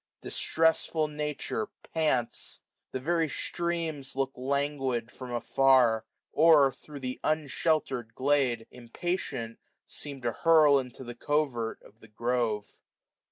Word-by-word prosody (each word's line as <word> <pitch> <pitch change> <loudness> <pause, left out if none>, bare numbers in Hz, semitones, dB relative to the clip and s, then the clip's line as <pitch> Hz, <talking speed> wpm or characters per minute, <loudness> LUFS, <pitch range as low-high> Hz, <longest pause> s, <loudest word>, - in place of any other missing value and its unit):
Distressful 160 -1 +1
Nature 150 -7 -3 0.3
pants. 150 -7 0 0.3
The 130 - -3
very 165 +3 +1
streams 165 -5 -2
look 135 0 0
languid 135 -3 -1
from 130 -1 -9
afsu*; 120 -1 +3 0.3
Or, 150 -4 +6
thro' 145 +3 -11
tfa' 130 -1 -4
unshelter'd 150 -6 0
glade, 130 -4 +2
impatient, 120 -2 -4 0.3
seem 140 -2 -6
To 120 - +1
hurl 155 0 +5
into 125 0 -7
the 120 -1 -7
covert 125 -4 -1
of 110 - -19
the 110 - -15
grove. 115 -1 -2
135 Hz, 115 wpm, -29 LUFS, 120-155 Hz, 0.3 s, Or